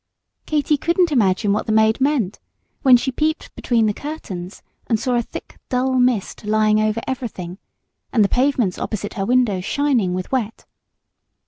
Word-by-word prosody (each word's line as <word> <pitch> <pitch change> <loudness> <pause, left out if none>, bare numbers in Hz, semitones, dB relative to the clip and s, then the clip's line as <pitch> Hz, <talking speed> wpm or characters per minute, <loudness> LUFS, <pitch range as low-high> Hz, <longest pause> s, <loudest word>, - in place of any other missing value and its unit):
Katy 300 -1 +1
couldn't 340 +3 +1
imagine 205 -5 +2
what 210 - -2
the - - 0
maid 220 +3 +3
meant, 260 -9 0 0.4
when 260 -4 +7
she 265 +2 -2
peeped 310 +4 -2
between 230 -3 +1
the 210 - +1
curtains 200 - -7 0.2
and 225 - +1
saw 255 +2 -1
a 240 - +2
thick - - -10
dull 255 +1 +1
mist 245 -6 0
lying 215 0 +2
over 215 +1 0
everything, 200 -8 -5 0.5
and 225 -4 +4
the - - +3
pavements 250 -6 +1
opposite 205 -1 -4
her 195 -1 -3
window 245 -7 +2
shining 235 -5 0
with 185 0 -5
wet. 230 -5 -2
230 Hz, 160 wpm, -20 LUFS, 210-265 Hz, 0.5 s, when